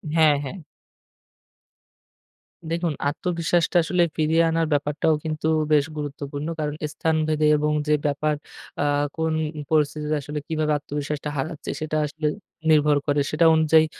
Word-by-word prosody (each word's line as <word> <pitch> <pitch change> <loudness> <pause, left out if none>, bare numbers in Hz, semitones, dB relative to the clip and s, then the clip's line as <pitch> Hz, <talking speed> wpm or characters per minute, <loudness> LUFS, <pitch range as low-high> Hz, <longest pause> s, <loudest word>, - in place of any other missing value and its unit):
হ্যাঁ, 155 -2 +5
হ্যাঁ। 140 +7 -6 2.1
দেখুন, 170 -1 0 0.2
আত্মবিশ্বাসটা 170 +1 0
আসলে 175 +1 +2
ফিরিয়ে 160 +1 +3
আনার 165 0 +1
ব্যাপারটাও 145 +2 +1
কিন্তু 155 0 -2 0.3
বেশ 145 -1 +4
গুরুত্বপূর্ণ। 145 0 -5
কারণ 150 -1 -2 0.2
স্থানভেদে 155 -1 +1
এবং 150 +1 0 0.2
যে 150 - +3
ব্যাপার 150 +1 +1 0.5
আ - - +1 0.3
কোন 160 0 0 0.4
পরিস্থিতিতে 150 0 +1
আসলে 150 +1 -5
কিভাবে 155 -2 0
আত্মবিশ্বাসটা 145 +1 -4
হারাচ্ছে, 155 +3 -4
সেটা 155 0 -1
আসলে 150 +1 -3 0.4
নির্ভর 150 -1 +4
করে। 145 0 +2
সেটা 165 +2 +3
অনুযায়ী 160 0 +5
155 Hz, 125 wpm, -24 LUFS, 150-160 Hz, 2.1 s, হ্যাঁ